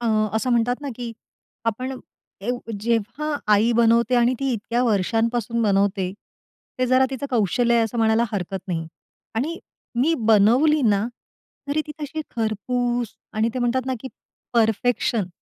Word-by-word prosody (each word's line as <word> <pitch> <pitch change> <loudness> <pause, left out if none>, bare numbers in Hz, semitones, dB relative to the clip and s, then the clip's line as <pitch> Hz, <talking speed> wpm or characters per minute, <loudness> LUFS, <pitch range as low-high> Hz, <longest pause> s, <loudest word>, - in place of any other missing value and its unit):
अ, 235 - -2 0.3
असं 255 +3 0
म्हणतात 245 +2 +2
ना, 285 - -5
की 240 -2 -5 0.5
आपण 255 +4 -2 0.4
ए 210 +5 -2 0.3
जेव्हा 235 +7 -1 0.2
आई 225 +4 +3
बनवते 235 +1 +4
आणि 240 +1 +3
ती 270 -1 0
इतक्या 235 +2 -1
वर्षांपासून 230 +2 +1
बनवते 195 -2 +1 0.7
ते 255 - +2
जरा 255 +1 +4
तिचं 270 +1 -4
कौशल्य 235 +1 +2
आहे 230 - +4
असं 225 +1 -4
म्हणायला 225 +1 +3
हरकत 195 -1 -2
नाही 165 -2 -2 0.5
आणि 305 +10 -2 0.4
मी 320 +6 +3
बनवली 245 +9 +5
ना, 210 -2 +3 0.6
तरी 300 +2 +1
ती 300 - -6
तशी 300 +2 -4 0.2
खरपूस 240 +2 -1 0.2
आणि 220 +1 +1
ते - - -1
म्हणतात 250 +1 0
ना, 260 - 0
की 265 - -6 0.4
परफेक्शन. 225 -2 +1
235 Hz, 150 wpm, -23 LUFS, 220-255 Hz, 0.7 s, बनवली